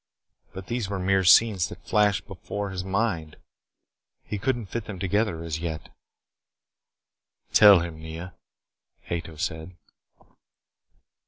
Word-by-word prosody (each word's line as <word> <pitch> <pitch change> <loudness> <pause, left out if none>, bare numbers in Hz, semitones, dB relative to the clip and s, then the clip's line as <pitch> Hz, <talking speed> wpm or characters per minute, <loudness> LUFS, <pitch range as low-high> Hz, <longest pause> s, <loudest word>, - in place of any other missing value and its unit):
But 95 -1 -8
these 115 -3 -3
were 100 - -2
mere 95 +1 +1
scenes 95 0 +5
that - - -12
flashed 105 -2 +2
before 100 -1 -6
his 90 -1 -4
mind. 95 -6 -2 0.9
He 105 - -5
could 120 +4 0
not 110 -5 -8
fit 115 -2 -4
them 100 - -7
together, 95 -2 -1
as 80 -2 -4
yet. 80 -2 -5 1.6
"Tell 100 -4 +8
him, 85 -2 -6
Nea," 80 +3 -8 0.8
Ato 80 -2 -4
said. 80 +4 -4
95 Hz, 120 wpm, -26 LUFS, 85-105 Hz, 1.6 s, Tell